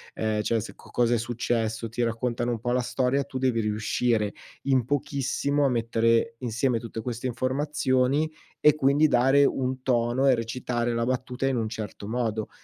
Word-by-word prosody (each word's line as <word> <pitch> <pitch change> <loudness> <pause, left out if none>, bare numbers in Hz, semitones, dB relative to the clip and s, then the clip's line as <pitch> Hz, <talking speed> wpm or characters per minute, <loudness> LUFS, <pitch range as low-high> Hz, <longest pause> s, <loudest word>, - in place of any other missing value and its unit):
ehm, 110 -1 0
cioè 115 +1 +1
se 105 - -7
co - - -17
cosa 120 -1 +2
è 120 - +3
successo, 115 -1 -2
ti 120 +2 -2
raccontano 120 +1 -1
un 115 - -2
po' 120 +2 -1
la 125 - +2
storia, 130 +2 0
tu 130 -1 -7
devi 125 -3 +1
riuscire 105 0 0 0.3
in 130 -3 +2
pochissimo 140 +2 -1
a 135 - +3
mettere 115 -1 +1
insieme 120 0 0
tutte 115 0 -6
queste 120 +2 -4
informazioni 130 +2 +1 0.3
e 150 - +5
quindi 145 +1 +4
dare 135 +2 +4
un 130 -1 -1
tono 125 +1 +1
e 130 - +6
recitare 120 +1 -2
la 115 0 0
battuta 130 +1 -2
in 135 - +1
un 110 -2 -1
certo 110 -2 -6
modo. 110 -3 -2
120 Hz, 175 wpm, -26 LUFS, 115-130 Hz, 0.3 s, e